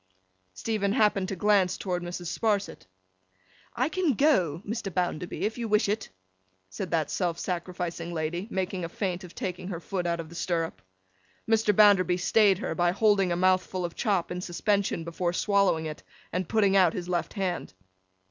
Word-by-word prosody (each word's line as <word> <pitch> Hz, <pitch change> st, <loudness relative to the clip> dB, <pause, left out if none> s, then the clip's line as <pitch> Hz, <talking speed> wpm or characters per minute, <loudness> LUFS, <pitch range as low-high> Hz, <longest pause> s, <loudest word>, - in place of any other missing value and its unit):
Stephen 205 Hz, -, -1 dB
happened 210 Hz, -5 st, +2 dB
to 195 Hz, -, -3 dB
glance 195 Hz, -1 st, +3 dB
towards 180 Hz, -2 st, -3 dB
Mrs. 175 Hz, 0 st, -5 dB
Sparsit. 205 Hz, -, -1 dB, 0.9 s
'I 255 Hz, +5 st, +1 dB
can 355 Hz, -5 st, +1 dB
go, 190 Hz, -, +2 dB
Mr. 220 Hz, -2 st, -3 dB
Bounderby, 175 Hz, -1 st, -2 dB
if 220 Hz, +3 st, -2 dB
you 230 Hz, -, -2 dB
wish 210 Hz, 0 st, +3 dB
it,' 210 Hz, +2 st, -2 dB, 0.6 s
said 95 Hz, -, -5 dB
that 160 Hz, -2 st, 0 dB
self 175 Hz, -3 st, -1 dB
sacrificing 175 Hz, -1 st, -4 dB
lady, 170 Hz, +4 st, -3 dB
making 190 Hz, -3 st, -2 dB
a 165 Hz, -, -3 dB
feint 185 Hz, 0 st, -3 dB
of 180 Hz, -, -11 dB
taking 180 Hz, -1 st, -4 dB
her 180 Hz, -4 st, -4 dB
foot 180 Hz, 0 st, -3 dB
out 170 Hz, 0 st, -1 dB
of 160 Hz, -1 st, -6 dB
the -, -, -12 dB
stirrup. 165 Hz, -, -2 dB, 0.7 s
Mr. 220 Hz, -1 st, +3 dB
Bounderby 195 Hz, -3 st, +5 dB
stayed 195 Hz, +1 st, +4 dB
her, 205 Hz, -, -3 dB
by 175 Hz, -1 st, +2 dB
holding 200 Hz, -2 st, +3 dB
a -, -, +1 dB
mouthful 185 Hz, 0 st, +1 dB
of 170 Hz, -, -5 dB
chop 195 Hz, -7 st, 0 dB
in 180 Hz, 0 st, -3 dB
suspension 195 Hz, 0 st, 0 dB
before 170 Hz, +1 st, -2 dB
swallowing 200 Hz, -5 st, +2 dB
it, 155 Hz, -1 st, -6 dB, 0.3 s
and 180 Hz, -1 st, -2 dB
putting 200 Hz, -3 st, +3 dB
out 185 Hz, -4 st, +5 dB
his 180 Hz, -1 st, -5 dB
left 175 Hz, -1 st, -2 dB
hand. 185 Hz, -, -3 dB
185 Hz, 175 wpm, -27 LUFS, 175-205 Hz, 0.9 s, Bounderby